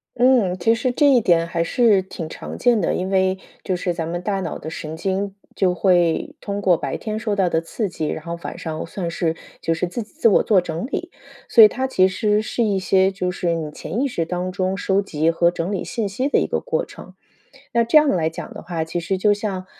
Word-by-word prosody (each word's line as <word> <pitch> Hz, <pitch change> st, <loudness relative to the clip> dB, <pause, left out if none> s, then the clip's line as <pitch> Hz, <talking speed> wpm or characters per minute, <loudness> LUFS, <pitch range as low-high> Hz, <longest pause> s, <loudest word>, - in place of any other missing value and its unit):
嗯， 245 Hz, -7 st, +3 dB
其 205 Hz, +6 st, +3 dB
实 240 Hz, +2 st, 0 dB
这 290 Hz, -, +2 dB
一 250 Hz, -3 st, +5 dB
点 170 Hz, -5 st, +3 dB
还 170 Hz, -1 st, -1 dB
是 215 Hz, +1 st, +3 dB
挺 185 Hz, -3 st, -7 dB
常 -, -, -8 dB
见 240 Hz, -4 st, +3 dB
的， -, -, 0 dB
因 185 Hz, +1 st, -2 dB
为 190 Hz, -1 st, +2 dB, 0.3 s
就 185 Hz, -, -1 dB
是 180 Hz, 0 st, -2 dB
咱 165 Hz, -2 st, -3 dB
们 175 Hz, +1 st, -3 dB
大 195 Hz, +1 st, -1 dB
脑 190 Hz, -, -4 dB
的 155 Hz, -, -7 dB
神 160 Hz, -1 st, -6 dB
经 195 Hz, +2 st, -2 dB, 0.2 s
就 185 Hz, -2 st, +2 dB
会 175 Hz, -2 st, +2 dB
通 200 Hz, -1 st, -3 dB
过 190 Hz, -3 st, +4 dB
白 -, -, -3 dB
天 215 Hz, -1 st, -4 dB
受 215 Hz, -2 st, -1 dB
到 190 Hz, -3 st, +2 dB
的 160 Hz, -1 st, +1 dB
刺 205 Hz, +6 st, -3 dB
激， 160 Hz, -4 st, -4 dB
然 155 Hz, -, -4 dB
后 170 Hz, 0 st, -3 dB
晚 -, -, -6 dB
上 160 Hz, -1 st, -4 dB
算 175 Hz, -4 st, -4 dB
是 165 Hz, -1 st, -1 dB, 0.3 s
就 165 Hz, -, 0 dB
是 165 Hz, -, -1 dB
自 235 Hz, +7 st, -4 dB
己 215 Hz, -, -11 dB
自 310 Hz, -6 st, +2 dB
我 210 Hz, -, +5 dB
做 205 Hz, -4 st, +4 dB
整 175 Hz, +3 st, -4 dB
理， 350 Hz, +5 st, -4 dB, 0.4 s
所 230 Hz, -, +8 dB
以 -, -, +11 dB
它 260 Hz, +5 st, -3 dB
其 190 Hz, -8 st, +3 dB
实 210 Hz, +3 st, +1 dB
是 235 Hz, +2 st, -1 dB
一 205 Hz, -3 st, +1 dB
些 190 Hz, +1 st, +3 dB
就 185 Hz, -2 st, -2 dB
是 175 Hz, -2 st, -1 dB
你 160 Hz, -2 st, -3 dB
潜 155 Hz, +8 st, -4 dB
意 280 Hz, -, +2 dB
识 170 Hz, -10 st, -2 dB
当 180 Hz, +2 st, -3 dB
中 185 Hz, +1 st, -1 dB
收 195 Hz, 0 st, +1 dB
集 160 Hz, -4 st, 0 dB
和 170 Hz, +1 st, +3 dB
整 175 Hz, +2 st, -3 dB
理 200 Hz, -, -2 dB
信 220 Hz, -4 st, -3 dB
息 255 Hz, +8 st, -1 dB
的 285 Hz, -, +3 dB
一 -, -, 0 dB
个 -, -, -1 dB
过 -, -, -1 dB
程。 -, -, -12 dB, 0.6 s
那 235 Hz, -, +4 dB
这 235 Hz, +7 st, +4 dB
样 300 Hz, -1 st, +5 dB
来 165 Hz, -7 st, +1 dB
讲 165 Hz, -, -8 dB
的 -, -, -8 dB
话， 170 Hz, -1 st, -3 dB
其 160 Hz, +2 st, -3 dB
实 170 Hz, +3 st, -2 dB
就 205 Hz, +2 st, +3 dB
像， 200 Hz, -3 st, -4 dB
190 Hz, 265 characters per minute, -21 LUFS, 170-215 Hz, 0.6 s, 以